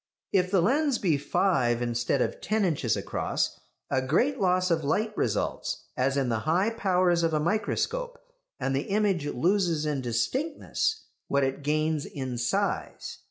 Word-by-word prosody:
If 185 -2 +3
the 185 -3 +3
lens 280 - +2
be 175 -8 +2
five 130 -6 +1
instead 120 +2 0
of - - -4
ten 215 -1 +1
inches 140 - 0
across, - - -2 0.3
a 130 - +2
great 235 - +1
loss 185 -1 +2
of 160 -1 +1
light 215 +9 0
results, 105 - -2
as 135 +2 +1
in 135 -2 +1
the 115 -2 0
high 175 - +1
powers 180 -5 +2
of 165 -1 +1
a - - +2
microscope, 220 - -1 0.4
and 135 0 -1
the 135 - -2
image 195 -7 +1
loses 170 +2 +1
in 145 -3 -1
distinctness 265 - -1 0.2
what 140 0 +2
it 135 +1 -1
gains 155 +1 0
in 130 -4 -5
size. 120 0 -2
165 Hz, 160 wpm, -27 LUFS, 135-205 Hz, 0.4 s, If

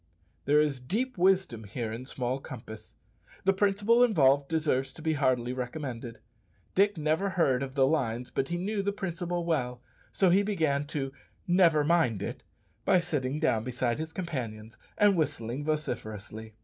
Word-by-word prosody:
There 145 +2 +4
is 150 -3 +1
deep 225 - -2
wisdom 185 - +2
here 110 +2 -4
in 120 +3 -6
small 130 0 -2
compass. 110 -5 -10 0.5
The 195 - +5
principle 205 +4 +3
involved 140 - +4
deserves 150 -4 0
to - - -12
be 160 -1 +1
heartily 130 -4 +1
recommended. 125 -2 -5 0.6
Dick 200 0 +3
never 155 +6 +1
heard 140 -9 +2
of 135 0 -5
the 135 -2 +4
lines, 125 -5 -1
but 135 - -1
he 175 - -2
knew 200 +3 -1
the 200 +1 -1
principle 175 -3 -3
well, 125 -7 -1 0.3
so 190 -3 +3
he 190 +3 +5
began 160 -9 0
to 140 -2 -3 0.3
"never 170 -4 +4
mind 145 - +2
it" - - -5 0.4
by 185 -2 +4
sitting 150 -5 -2
down 125 -9 +1
beside 125 +1 -1
his 160 0 -4
companions 120 - -5 0.2
and 205 -1 +5
whistling 145 -5 -2
vociferously. 110 -8 -4
145 Hz, 160 wpm, -29 LUFS, 125-175 Hz, 0.6 s, The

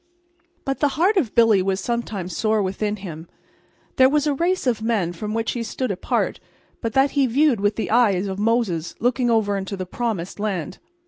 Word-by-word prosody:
But 270 -1 -2
the 295 - +3
heart 375 +7 +3
of 290 - 0
Billy 225 -4 +5
was 190 0 0
sometimes 205 -5 -3
sore 215 -1 +1
within 205 +2 -2
him. 170 -5 -8 0.7
There 260 0 +6
was 295 +1 +1
a 295 - +2
race 350 +5 0
of 235 -4 +1
men 215 -7 0
from 210 +5 -5
which 225 0 -1
he 240 - -3
stood 230 +1 -3
apart 185 - -1 0.4
but 230 -2 -3
that 270 +1 +3
he 275 -2 +2
viewed 270 -1 +3
with 205 +1 +1
the 220 - -3
eye 230 -3 +5
of 195 0 -4
Moses 210 -7 0
looking 245 +1 +1
over 220 -3 +2
into 195 +1 -4
the 185 - -4
promised 200 -3 -3
land. 190 -5 -3
220 Hz, 195 wpm, -22 LUFS, 195-245 Hz, 0.7 s, There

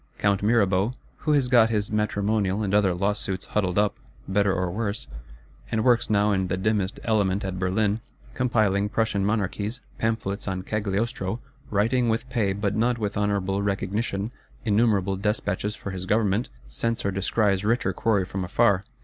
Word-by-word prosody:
Count 100 -1 +1
Mirabeau, 105 0 +2 0.2
who 155 - 0
has 140 -4 +3
got 120 -3 +5
his 105 -2 -1
matrimonial 105 -1 0
and 100 -1 -1
other 100 -3 +3
Lawsuits 100 0 -1
huddled 95 -4 -1
up, 105 0 +2 0.3
better 100 +1 +2
or 90 -1 -1
worse; 105 +1 -2 0.6
and 110 -1 0
works 120 -2 +3
now 105 0 +3
in 95 -2 +1
the 95 - -1
dimmest 100 0 0
element 100 -3 +1
at 95 -1 -3
Berlin; 100 +4 +1 0.3
compiling 110 -6 +1
Prussian 110 -2 0
Monarchies, 105 +2 -1 0.2
Pamphlets 110 -3 -2
On 95 -1 -2
Cagliostro; 105 +1 -2 0.3
writing, 115 +4 +2
with 115 +3 -1
pay, 105 -6 +1
but 100 +1 -1
not 120 +2 +2
with 105 -3 -2
honourable 100 -1 0
recognition, 100 +1 -2 0.3
innumerable 100 -3 +2
Despatches 105 +1 -1
for 100 - -6
his 95 0 -6
Government,—scents 100 - -1
or 100 - +1
descries 100 +1 +1
richer 105 -3 +1
quarry 100 -1 +1
from 95 0 -4
afar. 90 +2 +2
100 Hz, 155 wpm, -25 LUFS, 95-110 Hz, 0.6 s, got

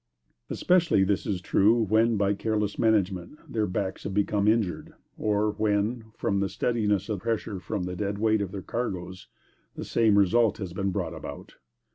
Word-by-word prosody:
Especially 175 - +3
is 95 0 0
this 95 -4 -2
true, 105 +5 +4
when, 110 +2 +3
by 100 0 +2
careless 105 0 -2
management, 100 - +1
their 110 -2 -1
backs 95 0 -3
have 95 - -4
become 105 0 +1
injured; 110 -5 0 0.2
or 105 0 +1
when, 105 +2 0
from 100 - 0
the 100 0 0
steadiness 105 -5 0
of 105 -4 -2
pressure 110 -2 -2
from 90 +1 -3
the 90 0 -4
"dead 100 +1 -2
weight" 110 0 +2
of 100 -2 -3
their 95 -2 -6
cargoes, 95 -6 -4 0.5
the - - -6
same 110 -3 +3
result 105 +3 +3
has 95 -5 -6
been 100 +1 -1
brought 95 - -3
about. - - -9
105 Hz, 170 wpm, -27 LUFS, 95-110 Hz, 0.5 s, true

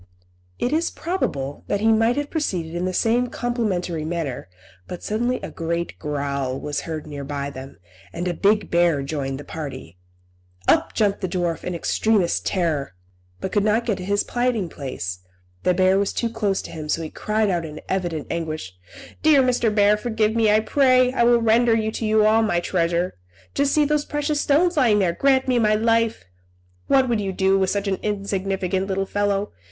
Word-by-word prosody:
It 250 - -1
is 325 +2 +1
probable 145 - -3
that 205 - 0
he 220 +2 +2
might 225 +3 +3
have 290 0 -2
proceeded 180 - -2
in 175 +1 -2
the 185 - -1
same 235 +6 +1
complimentary 205 -10 -2
manner, 155 - -4 0.4
but 180 - -7
suddenly 240 +4 -1
a - - -5
great 170 +1 -3
growl 140 -3 -2
was 150 -1 -3
heard 155 -2 -4
near 145 -2 -7
by 140 0 -4
them, 135 0 -10 0.3
and 175 +2 -4
a 175 - 0
big 205 +4 +1
bear 170 -5 +3
joined 135 -2 -3
the - - -7
party. 135 - -8 0.7
Up - - +3
jumped 205 -2 +1
the 185 - -1
dwarf 175 -2 -2
in 180 - -3
extremest 200 +1 +1
terror, 155 - -1 0.4
but 190 - -4
could 205 - +2
not 215 +3 +2
get 215 -5 0
to - - -5
his 205 +2 0
hiding 240 -7 0
place, 90 - -5 0.4
the 180 - +2
bear 190 +1 +4
was 200 - 0
too 235 -1 -1
close 205 -4 -1
to - - -9
him; 155 -2 -7
so 165 - 0
he 155 - -6
cried 215 -1 0
out 175 -2 -1
in 155 -2 -7
very - - -11
evident 175 -5 -2
anguish 155 - -4 0.5
"Dear 300 -4 +5
Mr. 245 -2 +2
Bear, 210 0 +4
forgive 220 -1 0
me, 225 -2 +3
I 215 +1 +4
pray! 255 +1 +3
I 240 - 0
will 235 0 +4
render 230 +1 +4
to 225 - -4
you 215 0 +4
all 220 +1 +4
my 190 -6 +1
treasure. 175 - -1 0.3
Just 280 0 +1
see 300 -1 +3
those 295 0 +1
precious 295 0 -1
stones 335 +4 +2
lying 235 -7 +4
there! 185 -4 +2
Grant 265 +6 +2
me 250 -2 +2
my 215 -2 +3
life! 230 +1 +1 0.6
What 265 -1 +4
would 230 -3 0
you 195 -1 -2
do 190 +1 +2
with 190 -1 +1
such 200 +1 -1
an 190 -2 -1
insignificant 195 -2 -2
little 195 0 -1
fellow? 205 0 -1
195 Hz, 195 wpm, -22 LUFS, 170-230 Hz, 0.7 s, Dear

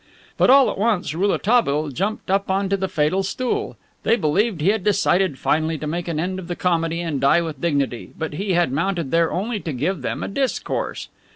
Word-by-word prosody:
But - - +3
all 270 0 +7
at - - -7
once 205 -8 +1
Rouletabille 185 -4 +1
jumped 195 - -3
up 195 0 +1
onto 195 +1 +1
the 190 -1 -2
fatal 160 +3 +1
stool. 245 +6 -2 0.2
They 230 - +3
believed 195 +2 +1
he 160 +6 +2
had 210 -2 +1
decided 195 -6 +2
finally 160 +3 0
to 155 - -6
make 170 +3 -3
an 165 -3 -2
end 185 +3 -2
of 180 - -8
the 175 - -3
comedy 170 -2 0
and 160 -5 -3
die 140 +5 +4
with 155 -5 -6
dignity; 140 -7 -1
but 160 -2 -4
he 195 +5 -2
had 175 -6 +2
mounted 165 0 -1
there 165 0 +2
only 210 +4 -2
to 165 - -5
give 150 +6 -2
them - - -3
a - - -3
discourse. 265 +6 -2
175 Hz, 205 wpm, -22 LUFS, 155-195 Hz, 0.2 s, all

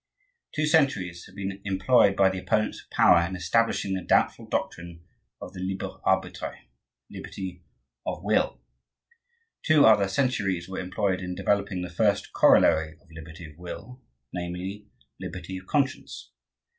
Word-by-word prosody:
Two 155 - +1
centuries 135 - +1
have 95 - -17
been 100 0 -5
employed 100 +1 +3
by 95 -1 +5
the 95 - -4
opponents 110 +3 -1
of - - -25
power 85 - +5
in 90 +2 -3
establishing 95 +2 +1
the 95 - -2
doubtful - - +1
doctrine 85 -1 -4 0.3
of - - -9
the 95 - -8
libre 95 +1 -4
arbitre,—liberty 90 +1 -5 0.4
of - - -4
will. - - +1 1.0
Two 155 -3 +5
other 105 -3 +6
centuries 95 -6 0
were 95 - -5
employed 95 +1 -1
in 90 0 -4
developing 100 -1 0
the - - -4
first 100 +3 +1
corollary 80 -1 +4
of 85 - -25
liberty 80 +1 -10
of 80 +1 -14
will, 125 +8 -9 0.3
namely, 90 +3 -5 0.3
liberty 90 +1 -6
of 95 - -18
conscience. 140 -2 -2
95 Hz, 140 wpm, -26 LUFS, 90-100 Hz, 1.0 s, other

